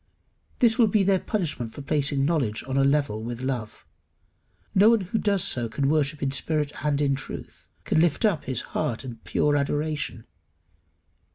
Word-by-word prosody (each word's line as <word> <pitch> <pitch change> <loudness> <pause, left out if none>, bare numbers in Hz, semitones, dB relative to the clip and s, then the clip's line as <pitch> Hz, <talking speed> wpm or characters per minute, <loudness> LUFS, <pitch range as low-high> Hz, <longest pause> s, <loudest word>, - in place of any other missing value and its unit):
This 235 0 +3
will 230 - +6
be 205 0 +2
their 190 0 +3
punishment 155 - -3
for 145 - -8
placing 140 -1 0
knowledge 130 -9 0
on 130 0 -4
a 135 - +4
level 140 -6 +1
with 120 +1 -5
love. 125 -5 -4 0.9
No 200 +3 +6
one 230 -2 +4
who 190 +4 -2
does 200 -3 +1
so 120 -2 +1
can 135 +4 0
worship 150 -1 0
in 135 - 0
spirit 150 +1 -1
and 145 -1 +1
in 140 -2 +2
truth, 135 0 -8
can 160 - +2
lift 170 +5 +2
up 185 -8 +1
his 130 -2 -1
heart 135 -4 -2
in 120 -3 -7
pure 145 +5 0
adoration. 145 -4 -2
145 Hz, 175 wpm, -25 LUFS, 130-170 Hz, 0.9 s, will